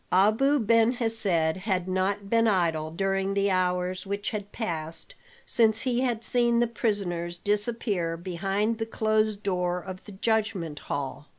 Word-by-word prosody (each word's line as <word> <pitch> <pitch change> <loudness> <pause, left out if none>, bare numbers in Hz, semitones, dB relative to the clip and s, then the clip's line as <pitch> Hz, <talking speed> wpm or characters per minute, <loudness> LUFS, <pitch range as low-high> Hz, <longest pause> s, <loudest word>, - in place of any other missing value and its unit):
Abu 215 +10 +4
Ben 230 +1 +4
Hesed 225 -3 -1 0.3
had 185 -2 -1
not 190 +2 -1
been 230 +2 +3
idle 165 -6 +1
during 195 +3 -1
the 200 0 +2
hours 180 0 0
which 200 +1 -3
had 205 -1 -5
passed 165 - -5 0.3
since 225 -3 +3
he 250 -1 0
had 240 -3 -1
seen 240 -1 +3
the 240 - +4
prisoners 190 -7 -2
disappear 205 -4 -1
behind 195 +6 -1
the 225 - -2
closed 215 -2 0
door 180 -2 0
of 185 +1 -9
the 210 - -10
judgment 190 -7 -1
hall. 145 +1 -4
200 Hz, 150 wpm, -27 LUFS, 180-225 Hz, 0.3 s, Abu